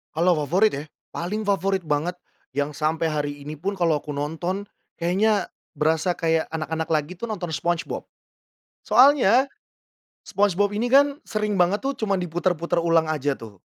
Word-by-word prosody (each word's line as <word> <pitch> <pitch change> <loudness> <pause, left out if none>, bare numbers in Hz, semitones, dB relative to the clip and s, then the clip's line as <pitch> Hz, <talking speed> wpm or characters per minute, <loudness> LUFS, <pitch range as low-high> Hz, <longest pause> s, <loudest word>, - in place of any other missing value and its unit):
Kalau 175 +2 +4
favorit, 195 +8 +3
ya? 145 +2 -4 0.3
Paling 205 +5 -3
favorit 195 -2 0
banget 155 +4 -1 0.4
yang 145 +1 -1
sampai 160 +2 0
hari 145 -1 -1
ini 150 - -5
pun 190 +6 -4
kalau 165 -4 +2
aku - - -14
nonton 165 +7 -3 0.3
kayaknya 195 +5 +1 0.3
berasa 160 +4 +1
kayak 165 -1 +1
anak-anak 160 0 -3
lagi 155 +2 0
tuh, 230 +6 -6
nonton 175 -6 -4
Spongebob. 170 +1 -2 0.7
Soalnya 260 -2 +5 0.8
Spongebob 205 0 +1
ini 220 +4 -1
kan 280 +2 +4
sering 210 -3 -1
banget 185 +4 +2
tuh 275 +1 0
cuma 200 -3 0
diputer-puter 175 -1 -1
ulang 165 -1 +3
aja 145 -2 -1
tuh. 105 -5 -12
175 Hz, 150 wpm, -24 LUFS, 155-205 Hz, 0.8 s, Soalnya